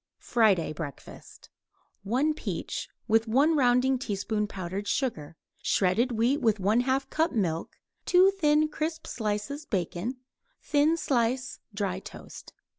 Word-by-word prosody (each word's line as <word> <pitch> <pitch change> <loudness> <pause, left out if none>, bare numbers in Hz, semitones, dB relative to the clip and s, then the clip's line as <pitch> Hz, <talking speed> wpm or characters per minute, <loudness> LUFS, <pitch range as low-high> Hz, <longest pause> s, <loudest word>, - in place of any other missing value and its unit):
FRIDAY 205 -9 +2
BREAKFAST 145 -3 -10 0.5
1 255 +10 +1
peach, - - -4 0.2
with 225 0 +3
1 280 +8 +3
rounding 255 -1 +3
teaspoon 210 -2 -2
powdered 190 +1 -5
sugar; 170 - -2 0.2
shredded 220 +7 +2
wheat 240 +6 +1
with 220 -4 +3
1/2 245 +7 +1
cup 320 +1 +1
milk; 170 -7 -1 0.3
2 370 +2 +6
thin 305 -5 +3
crisp 315 +1 -4
slices 220 +7 -3
bacon; 190 - -2 0.4
thin 300 +3 +2
slice 255 -3 0 0.2
dry 195 -2 -2
toast. - - -11
235 Hz, 115 wpm, -28 LUFS, 200-280 Hz, 0.5 s, 2